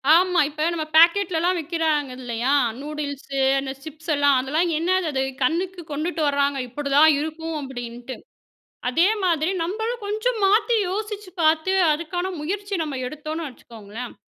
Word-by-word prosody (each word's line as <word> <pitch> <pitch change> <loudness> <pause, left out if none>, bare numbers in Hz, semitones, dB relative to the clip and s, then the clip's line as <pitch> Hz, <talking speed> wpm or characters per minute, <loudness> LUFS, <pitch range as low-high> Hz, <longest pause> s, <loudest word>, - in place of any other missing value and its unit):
ஆமா. 360 0 +3
இப்ப 305 +1 -2
நம்ம 320 -2 -2
பேக்கெட்லலாம் 345 +1 +4
விக்கிறாங்க 310 -3 -1
இல்லயா! 245 +1 -1 0.3
நூடுல்ஸு 285 -2 -5 0.2
அந்த 270 0 -4
சிப்ஸ் 315 +1 -6
எல்லாம், 285 -1 +4
அதெல்லாம் 310 +7 0
என்னது 365 +2 +1
அது? 265 - +1 0.2
கண்ணுக்கு 350 +6 -1
கொண்டுட்டு 310 +2 -2
வராங்க! 280 0 +1
இப்பிடிதான் 285 +4 +4
இருக்கும் 320 +1 -4
அப்பிடின்ட்டு. 245 -1 -7 0.7
அதே 330 +9 +3 0.2
மாதிரி 330 -2 +2
நம்மளும் 445 +7 -3
கொஞ்சம் 435 +3 -1
மாத்தி 440 +4 +3
யோசிச்சு 415 0 -4
பார்த்து 315 +3 +3 0.2
அதுக்கான 350 +4 -3
முயற்சி 400 +6 -3
நம்ம 300 -3 -4
எடுத்தோன்னு 310 +3 -5
வச்சுக்கோங்களேன்! 230 -1 -10
315 Hz, 130 wpm, -23 LUFS, 280-360 Hz, 0.7 s, பேக்கெட்லலாம்